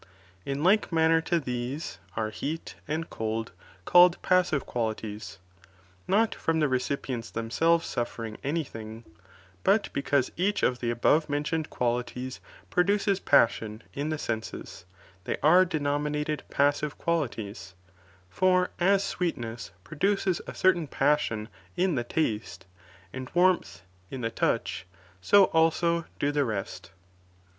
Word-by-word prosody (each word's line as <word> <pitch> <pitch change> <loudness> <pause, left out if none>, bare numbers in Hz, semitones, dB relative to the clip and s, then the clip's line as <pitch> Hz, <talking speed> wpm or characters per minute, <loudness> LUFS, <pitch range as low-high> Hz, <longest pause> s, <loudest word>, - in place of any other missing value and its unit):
In 140 +2 -2
like 200 +4 +3
manner 165 0 +4
lo 170 - +4
these 130 +1 -4 0.2
arc 110 -1 -2
lieal 160 +3 -4 0.2
anil 160 +2 -2
cold 110 0 -3 0.3
called 175 0 +6
passive 180 -6 +2
quahties, 110 -3 -4 0.7
not 215 +4 +3
from 165 0 -1
the 150 - +3
recipients 130 -2 -2
themselves 165 +9 +1
suffering 115 -2 -4
any 155 +4 0
thing, 110 -3 -9 0.6
but 200 +2 +2
because 140 -1 +1
each 200 +4 0
of 125 -1 +2
the 120 - -2
above 145 +7 +2
mentioned 150 +2 -1
quaUties 125 +1 -2 0.3
produces 200 +2 +2
passion 110 - +2
in 145 +2 -3
the 155 - -1
senses, 110 - -5 0.4
they - - -2
are 175 +5 +7
denominated 150 -1 -1
passive 145 +1 +1
qualities; 110 - -3 0.5
for 185 - +2
as 195 +2 +3
sweetness, 120 - -3
produces 190 - 0
a - - -7
certain 180 -4 +3
passion 135 -7 +1 0.3
in 180 0 +2
the 125 -4 0
teste, 110 -8 -2 0.5
and 130 0 -6
warmth, 175 - +2 0.3
in 130 - -6
the 115 -1 -2
touch, 95 -6 -1 0.3
so 200 - +6
also 165 +1 +2
do 145 - 0
the 145 -1 +1
rest. 105 -7 -4
145 Hz, 125 wpm, -28 LUFS, 120-170 Hz, 0.7 s, are